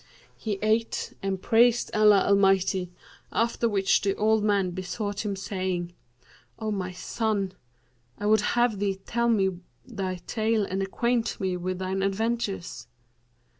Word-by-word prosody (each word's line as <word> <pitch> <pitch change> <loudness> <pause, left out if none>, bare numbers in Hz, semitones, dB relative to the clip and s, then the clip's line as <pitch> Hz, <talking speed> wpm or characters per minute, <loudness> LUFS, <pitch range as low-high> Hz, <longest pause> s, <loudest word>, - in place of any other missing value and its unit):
He 210 -3 -3
ate 220 +1 0
and 195 -1 -2
praised 235 +4 +3
Allah 210 -2 +6
Almighty; 195 -2 +3 0.4
after 235 0 +1
which 195 -2 +2
the 195 -1 0
old 220 0 +2
man 200 -3 +2
besought 195 +3 -4
him 205 -2 -2
saying, 185 -3 -3 0.6
'O 220 -1 -3
my 185 -3 -3
son, 200 +1 -2 0.7
I 205 - -5
would 215 0 +4 0.2
have 240 -4 +2
thee 200 -1 0
tell 235 0 0
me 190 -5 +1 0.3
thy 195 -6 -4
tale 220 -2 0
and 195 0 -3
acquaint 235 +4 -1
me 190 -3 -1
with 180 +1 -3
thine 190 +1 -2
adventures.' 195 - -2
200 Hz, 135 wpm, -26 LUFS, 190-220 Hz, 0.7 s, Allah